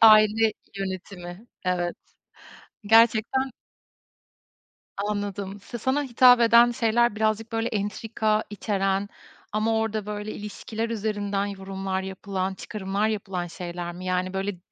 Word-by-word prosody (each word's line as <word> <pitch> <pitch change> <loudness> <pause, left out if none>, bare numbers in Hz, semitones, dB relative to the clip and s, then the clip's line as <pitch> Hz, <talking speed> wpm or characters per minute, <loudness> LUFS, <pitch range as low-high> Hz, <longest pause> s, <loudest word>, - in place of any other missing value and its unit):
aile 215 0 +7 0.2
yönetimi, 190 0 -6 0.2
evet, 175 -1 0 0.9
gerçekten 230 +4 +4 1.5
Anladım. 205 -1 -3
Sa 240 +4 -7
sana 260 +6 +1
hitap 250 -2 +6
eden 235 +1 +7
şeyler 235 -1 +2
birazcık, 220 +1 0
böyle, 225 +1 0
entrika 215 +1 -1
içeren 195 -1 0 0.4
ama 220 +1 +1
orada, 220 -2 -1
böyle, 210 0 -4
ilişkiler 220 +2 -5
üzerinden 205 -2 -1
yorumlar 195 -1 -4
yapılan, 190 0 -3
çıkarımlar 200 0 -2
yapılan 195 -4 -3
şeyler 175 0 -6
mi? 180 +1 -8
Yani, 185 0 -1
böyle, 195 -1 -2
205 Hz, 110 wpm, -26 LUFS, 190-225 Hz, 1.5 s, aile